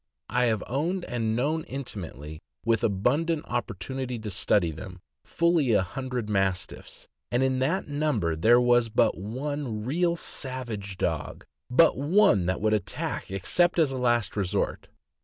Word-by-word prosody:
I 125 0 +2
have 110 -3 0
owned 165 - -1
and 115 -2 -1
known, 155 +6 0
intimately, 80 - -6 0.2
with 115 -2 +2
abundant 145 - +1
oppor 120 -3 -3
tunity 125 +4 -4
to 105 - -4
study 90 -2 +2
them, 90 +4 -9 0.2
fully 170 -7 +2
a 100 - +4
hundred 125 +4 -4
Mastiffs, 95 -3 -2 0.2
and 120 +2 +1
in 130 -1 +1
that 165 +9 0
number 145 - 0
there 115 +9 +5
was 120 -1 +3
but - - +2
one 120 - -4
real 170 +6 +1
savage 120 - -4
dog; 80 -6 -3 0.2
but 130 +3 +4
one 145 - +4
that 95 +1 -1
would 110 0 +2
attack 105 -4 -2
except 175 - +1
as 155 -5 +3
a 130 - -3
last 120 -2 +1
resort. 95 -3 -1
120 Hz, 150 wpm, -27 LUFS, 100-140 Hz, 0.2 s, there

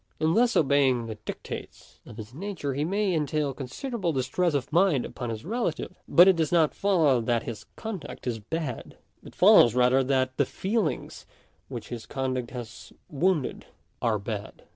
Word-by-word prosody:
In 160 +1 +2
thus 240 +3 +3
obeying 135 -5 +3
the 110 - -5
dictates - - -8
of 105 - -11
his 110 +1 -9
nature 165 -4 -4
he 145 +3 -1
may 195 +3 0
entail 150 -2 0
considerable 175 - -3
distress 150 +5 0
of 140 +1 -3
mind 170 -7 +3
upon 120 -2 -6
his 110 0 -5
relatives; 220 -5 -2
but 175 +2 +7
it 190 - +6
does 160 -2 0
not 165 -3 +3
follow 160 -11 +3
that 115 0 0
his 115 -3 -7
conduct 185 - -7
is 120 -3 -2
bad; 145 +2 -5 0.3
it - - -13
follows 120 0 +7
rather 125 +1 +4
that 130 -1 0
the 140 - +3
feelings 210 - -2 0.4
which 120 -5 -7
his 120 -2 -7
conduct 130 -3 -2
has 120 -3 -9 0.2
wounded 160 -1 0 0.3
are 115 -3 +1
bad. 105 0 -6
140 Hz, 165 wpm, -27 LUFS, 125-175 Hz, 0.4 s, but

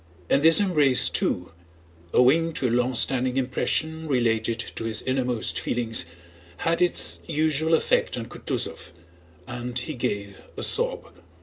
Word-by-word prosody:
And 140 - +4
this 165 +4 +7
embrace 150 -10 +3
too, 90 -1 -1 0.6
owing 160 +6 +3
to 130 - -1
a - - -1
long 125 +1 +1
standing 130 +1 0
impression 160 +5 -1
related 115 -4 0 0.2
to 115 - -4
his 110 -1 -1
innermost 125 -3 -1
feelings, 115 -7 -1 0.5
had 165 +1 -1
its 180 - +1
usual 160 0 +1
effect - - 0
on - - -5
Kutúzov 90 - -5 0.5
and 120 +2 -6
he 125 +5 -4
gave 100 -5 -4 0.2
a - - -2
sob. - - +2
130 Hz, 135 wpm, -24 LUFS, 120-160 Hz, 0.6 s, this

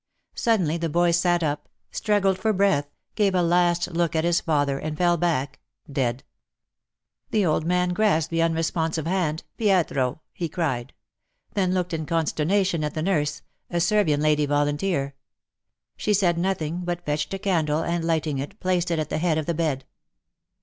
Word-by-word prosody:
Suddenly 185 -9 +1
the 165 -1 -2
boy 175 +2 +3
sat 175 0 +2
up, 145 -1 -2 0.2
struggled 195 -3 +1
for 220 +2 +1
breath, 190 -8 +2 0.2
gave 200 -3 +2
a 180 - +3
last 175 +1 +2
look 170 -1 0
at 160 - +2
his 170 0 +2
father, 145 -3 +1
and 155 0 -4
fell 175 0 +3
back 145 -6 -1
— 115 - -19
dead. 120 0 -1 1.1
The 210 -3 +2
old 160 0 +1
man 180 0 +2
grasped 175 -4 +1
the 165 0 +1
unresponsive 165 -1 0
hand 165 -3 -1
'' - - -50
Pietro,'' 165 - +1
he 170 -2 -3
cried 140 -7 -2 0.3
— - - -42
then 185 -2 +1
looked 180 -1 -1
in 155 -2 -3
consternation 165 +2 +1
at 150 - -3
the 155 - -1
nurse 150 -5 0
— - - -47
a 175 - -1
Servian 170 -5 +2
lady 150 -1 +2
volunteer. 145 +1 0 0.8
She 210 - +1
said 180 -3 +2
nothing, 170 -2 -1
but 175 0 -3
fetched 150 0 -1
a - - -3
candle 165 -6 0
and, 170 0 -1
lighting 160 -4 0
it, 145 +10 -6
placed 180 -2 0
it 170 - 0
at 155 -1 -3
the - - 0
head 165 -2 +1
of 155 - -1
the 170 - -1
bed. 150 -5 -1
165 Hz, 180 wpm, -24 LUFS, 150-180 Hz, 1.1 s, boy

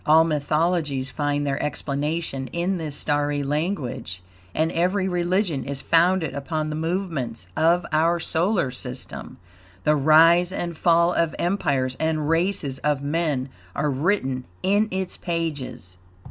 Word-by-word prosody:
All 160 +2 +6
mythologies 150 -3 0
find 145 -1 -1
their 140 0 -1
explanation 150 -1 -2
in 175 +6 -1
this 155 -3 -4
starry 145 -1 0
language, 135 - -3 0.3
and 160 +1 +1
every 185 +3 +1
religion 175 - 0
is 140 +2 -4
founded 170 +1 +3
upon 155 +2 -3
the - - -3
movements 160 - -3
of 170 +2 +3
our 165 +2 +3
solar 170 -2 +1
system. 125 0 -7 0.5
The 150 - +4
rise 165 +5 +5
and 175 -3 -3
fall 170 +2 +3
of 165 -2 +1
empires 140 -9 0
and 155 -2 0
races 165 -5 0
of 145 -2 0
men 145 -3 -1 0.3
are 150 0 0
written 135 -4 0 0.2
in 205 +3 +3
its 190 -1 -3
pages. 150 - -4
155 Hz, 130 wpm, -24 LUFS, 140-170 Hz, 0.5 s, All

